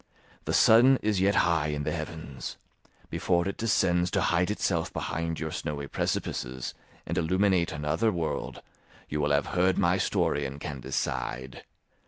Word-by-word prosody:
The - - -1
sun 125 +4 +7
is 105 -3 +1
yet 100 +1 +3
high 80 -3 +1
in 75 -1 -2
the 75 - -1
heavens; 75 -5 -6 0.5
before 85 +1 +1
it 100 - -2
descends 90 -6 +2
to - - 0
hide 90 +2 +2
itself 90 -5 0
behind 85 0 -3
your 80 -1 -3
snowy 75 -2 -4
precipices 65 -2 -3 0.3
and - - -1
illuminate 95 +1 +2
another 75 +10 0
world, 85 -4 -3 0.5
you 75 0 -1
will 75 - +1
have 70 - +2
heard 90 +1 +3
my - - +3
story 75 - +1
and 70 +2 -8
can 75 -2 -5
decide. 65 +1 -3
80 Hz, 155 wpm, -28 LUFS, 75-95 Hz, 0.5 s, sun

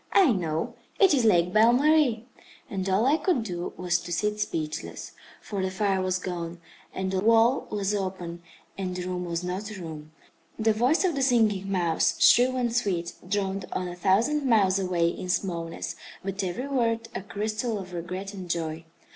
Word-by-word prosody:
I 375 -9 +6
know. 165 -6 -1 0.3
It 385 -5 +6
is 255 -5 +3
Lake 180 -4 +4
Belle 225 +2 +6
Marie." 275 -4 +3 0.5
And 195 -1 -2
all 195 +5 +3
I 285 +4 +4
could 330 - +1
do 175 -4 -4
was 175 -1 +1
to 175 - -8
sit 210 +4 -1
speechless. 155 -6 -4 0.3
For 200 -2 -3
the 190 - 0
fire 190 0 0
was 185 0 0
gone, 175 -2 -5 0.3
and 190 0 -3
the 190 - 0
wall 230 +5 +4
was 205 -1 -1
open, 185 -4 -4 0.4
and 185 -2 -3
the 180 - -3
room 180 -1 -3
was 170 0 -3
not 185 +4 -4
a 210 -3 -8
room. 155 -3 -8 0.5
The 220 0 +2
voice 250 - +2
of 365 -3 +2
the 275 - -2
Singing 215 -7 +2
Mouse, 175 -4 +1
shrill 250 +2 +6
and 240 -2 0
sweet, 175 -8 0 0.2
droned 195 -1 -1
on 185 - -2
a 175 - -6
thousand 225 +12 +2
miles 200 -7 +3
away 180 -3 +1
in 180 +2 -4
smallness, 170 -3 -2 0.3
but 195 +1 -3
every 185 +9 -3
word 230 -4 0
a - - -4
crystal 215 +3 -2
of 185 -2 -8
regret 185 +4 -5
and 185 -3 -8
joy. 165 -1 -3
195 Hz, 185 wpm, -27 LUFS, 180-225 Hz, 0.5 s, I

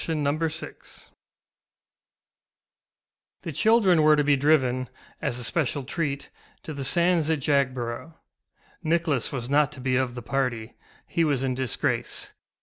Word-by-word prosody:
THE 165 - -2
LUMBER 150 +2 0
ROOM - - -7 2.7
The 165 - -4
children 195 - +4
were 155 0 +6
to 150 - +2
be 145 0 +4
driven, 130 -3 +2 0.3
as 120 - -1
a 125 - -4
special 140 +1 -1
treat, 140 0 -3 0.3
to 155 - -6
the 140 -1 -5
sands 170 +2 +3
at 160 - +2
Jagborough. 130 +1 -1 0.7
Nicholas 160 -6 0
was 125 -3 -4
not 145 +1 +3
to 140 - -11
be 130 0 +1
of 130 -2 -1
the 120 - -7
party; 120 -4 -2 0.3
he 170 - 0
was 140 -4 +1
in 130 -1 0
disgrace. 130 -3 -2
140 Hz, 145 wpm, -26 LUFS, 130-160 Hz, 2.7 s, were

